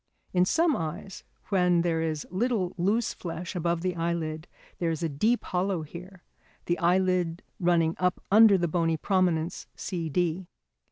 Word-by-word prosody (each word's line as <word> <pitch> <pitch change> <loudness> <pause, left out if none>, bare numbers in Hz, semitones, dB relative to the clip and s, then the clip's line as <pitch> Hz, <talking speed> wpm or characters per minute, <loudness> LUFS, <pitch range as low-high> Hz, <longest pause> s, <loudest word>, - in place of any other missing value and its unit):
In 180 0 +4
some 325 - +2
eyes, 165 +4 -5 0.3
when 180 -3 +3
there 165 -2 0
is 155 -2 -2
little 205 -2 0
loose 205 +6 +1
flesh 175 +2 -6
above 170 -1 0
the 180 0 -1
eyelid, 165 -1 -2 0.3
there 170 - 0
is 165 0 -3
a 165 - 0
deep 215 +12 +1
hollow 180 -2 -1
here, 180 +4 -11 0.4
the 175 - 0
eyelid 180 -1 +1 0.2
running 170 -2 +2
up 180 -1 +1
under 215 -1 +7
the 175 -1 0
bony 165 -1 +1
prominence, 175 -2 0
C 170 -4 -4
D. 175 +2 -1
175 Hz, 155 wpm, -27 LUFS, 165-185 Hz, 0.4 s, under